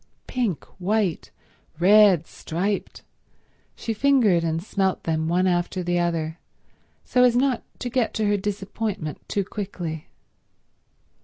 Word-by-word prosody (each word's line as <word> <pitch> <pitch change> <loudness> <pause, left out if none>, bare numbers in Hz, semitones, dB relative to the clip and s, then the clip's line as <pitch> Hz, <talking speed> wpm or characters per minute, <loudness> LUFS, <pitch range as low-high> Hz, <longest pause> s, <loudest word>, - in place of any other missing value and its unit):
Pink, 235 - -2
white, 195 -2 0 0.5
red, 190 -1 +6
striped—she 195 +5 -6
fingered 220 -8 +3
and 165 0 -1
smelt 190 -2 -1
them 160 -1 -1
one 180 +2 +2
after 180 0 0
the 175 0 +1
other, 165 -1 -1 0.7
so 250 - +3
as 245 -1 +5
not 255 -1 +2 0.2
to - - -4
get 245 -2 0
to 220 - 0
her 205 0 +3
disappointment 200 -3 -3
too 200 - 0
quickly. 180 -6 -5
195 Hz, 120 wpm, -24 LUFS, 170-215 Hz, 0.7 s, red